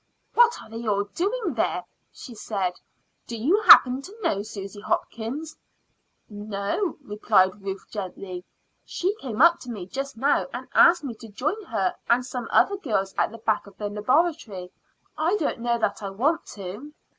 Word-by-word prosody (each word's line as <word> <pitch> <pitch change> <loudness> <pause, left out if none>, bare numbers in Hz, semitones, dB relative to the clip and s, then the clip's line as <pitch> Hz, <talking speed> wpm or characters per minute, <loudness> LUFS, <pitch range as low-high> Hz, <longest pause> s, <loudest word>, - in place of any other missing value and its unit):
"What 475 0 +5
are - - -14
they 225 +1 -7
all 200 -1 +2
doing 400 - -2
there?" - - 0 0.3
she 250 - -11
said. 195 -5 -3 0.5
"Do 230 - -5
you 325 - +2
happen 260 - +8
to 410 +9 -12
know 200 - +1
Susy 205 -1 -8
Hopkins?" 265 +9 -3 0.7
"No," 205 - -3
replied 205 -3 +2
Ruth 195 0 -5
gently. 185 -2 -6 0.4
"She 375 +3 -1
came 250 +1 +1
up 340 0 +6
to 250 - -10
me 205 -6 -5
just 275 +5 -5
now 275 +5 +2
and - - -6
asked 340 -2 +6
me 265 -4 -4
to 225 - -10
join 310 - -3
her 195 - 0 0.2
and 245 +1 +3
some 250 -2 -5
other 400 - +4
girls 200 - -1
at - - +1
the 230 - -9
back 220 -2 -1
of 200 - -16
the 205 -1 -3
Laboratory. 210 - 0 0.5
I 340 +6 +2
don't 300 - -1
know 235 0 0
that 210 -3 -1
I 200 - -4
want 280 +12 0
to." 205 +11 -8
230 Hz, 170 wpm, -25 LUFS, 200-305 Hz, 0.7 s, happen